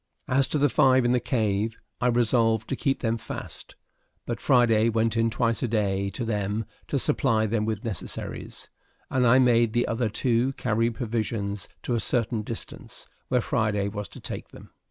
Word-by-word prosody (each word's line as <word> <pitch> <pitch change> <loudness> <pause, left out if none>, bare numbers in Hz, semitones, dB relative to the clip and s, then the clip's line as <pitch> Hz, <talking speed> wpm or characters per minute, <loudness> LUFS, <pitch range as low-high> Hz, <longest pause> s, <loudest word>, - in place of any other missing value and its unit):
As 135 +1 +3
to - - 0
the 145 0 +4
five 130 -1 +4
in 120 - +3
the 125 - +3
cave, 110 -2 -1 0.2
I 125 - +3
resolved 115 -2 +2
to - - 0
keep 135 +1 -1
them 115 -1 0
fast, - - -7 0.5
but 120 -1 -4
Friday 115 -4 +4
went 115 0 +1
in 115 0 +2
twice 115 -1 0
a 125 - 0
day 100 -3 0
to 115 +5 -4
them, 105 0 -1 0.2
to - - 0
supply 110 -1 +2
them 105 0 0
with 110 -1 -3
necessaries; 105 -8 -6 0.4
and 125 -2 +3
I 120 +2 +6
made 120 -3 +4
the 120 0 +1
other 115 -1 0
two 120 +4 +1
carry 115 -2 0
provisions 110 -3 -3
to 125 - -1
a 120 - +1
certain 115 0 +1
distance, 110 +1 -7 0.2
where 125 -1 +2
Friday 105 -3 0
was 105 -1 -5
to - - -11
take - - -5
them. - - -15
115 Hz, 180 wpm, -26 LUFS, 110-120 Hz, 0.5 s, I